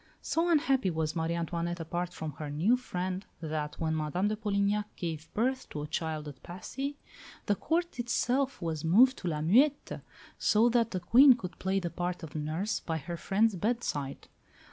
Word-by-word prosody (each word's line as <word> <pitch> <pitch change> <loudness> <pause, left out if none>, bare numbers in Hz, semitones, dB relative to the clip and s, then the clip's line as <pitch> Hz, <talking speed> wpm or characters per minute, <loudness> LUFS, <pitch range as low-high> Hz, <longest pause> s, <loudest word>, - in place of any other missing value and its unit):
So 335 +2 +1
unhappy 275 - +3
was 160 -1 -2
Marie 165 0 0
Antoinette 170 +1 -2
apart 175 +2 -3
from 160 -3 -5
her 150 -2 -4
new 165 +12 +3
friend 185 -6 -3 0.2
that, 155 -2 -4
when 160 -1 0
Madame 160 +6 0
de 215 - 0
Polignac 205 -1 0
gave 160 -2 -5
birth 260 +4 0
to 150 - -5
a - - -5
child 155 -1 -3
at 140 -3 -10
Passy, 270 +11 -5 0.5
the 205 - +3
Court 335 - -1
itself 250 0 0
was 160 -2 -2
moved 235 +11 +6
to 180 - -5
La 155 -3 -1
Muette, 260 - +3 0.4
so 220 +3 +4
that 235 -1 +2
the 185 - -2
Queen 255 +10 +7
could 185 -7 -8
play 190 +1 +1
the 175 -3 -4
part 180 -1 -3
of 155 -2 -8
nurse 160 +8 -2
by 160 -1 -3
her 170 +3 -5
friend's 205 +6 +1
bedside. 185 - -2
180 Hz, 180 wpm, -30 LUFS, 160-235 Hz, 0.5 s, Queen